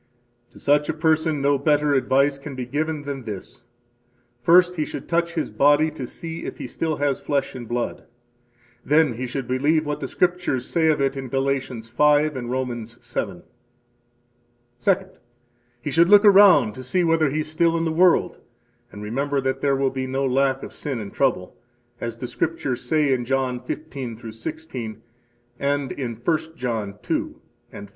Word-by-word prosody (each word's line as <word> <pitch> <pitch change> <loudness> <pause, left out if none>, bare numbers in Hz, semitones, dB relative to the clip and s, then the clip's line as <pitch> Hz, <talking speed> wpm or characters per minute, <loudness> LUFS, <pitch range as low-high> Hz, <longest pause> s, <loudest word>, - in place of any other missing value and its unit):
To - - -17
such 145 +1 +2
a - - -1
person 160 -2 +1
no 140 0 +3
better 150 0 +2
advice 140 +1 +2
can 140 -1 -8
be 125 -1 -4
given 150 +3 -2
than 140 -2 -5
this: 115 +2 -8 0.8
first, 180 +6 +5
he 155 - 0
should - - -7
touch 170 0 0
his 160 - -2
body 145 +3 +4
to 135 -5 -6
see 165 +4 -7
if - - -6
he - - -6
still 160 -1 -2
has 145 -2 -1
flesh 140 -2 -1
and 125 -3 -8
blood. 120 +1 -3 0.8
Then 150 -2 +3
he 125 +3 -4
should 130 0 -4
believe 150 +5 +1
what 150 0 -3
the 135 - -4
Scriptures 175 -7 0
say 165 -2 +1
of 155 -2 +3
it 135 0 +1
in 135 -1 -5
Galatians 135 -3 -2
5 150 +5 +3
and 120 -2 -5
Romans 120 -3 -4
7. 100 -7 -4 1.4
Second, 190 +3 0 0.6
he 145 - -3
should 170 +3 +4
look 205 +1 +7
around 190 - +7
to 130 - -9
see 175 +9 0
whether 165 -3 +3
he 155 +3 -1
is 155 - -5
still 165 +1 +2
in 165 - -1
the 160 - 0
world, 175 +2 +3 0.5
and 105 - -9
remember 140 +6 -1
that 135 0 -2
there 140 -1 +2
will 135 -1 +1
be 130 0 -3
no 135 +1 -1
lack 135 +1 +1
of - - -8
sin 135 -5 -4
and 100 -2 -7
trouble, 125 -10 0 0.4
as 115 -1 -4
the 125 - -5
Scriptures 130 0 -2
say 150 -4 +2
in 125 -1 -1
John 130 0 -1
15 135 -6 -6
16 120 -3 -6 0.6
and 140 -1 0
in 120 -4 -4
1 155 +9 +1 0.2
John 115 -6 -3
2 - - -2 0.3
and 100 - -9
5. - - -24
140 Hz, 180 wpm, -23 LUFS, 125-155 Hz, 1.4 s, look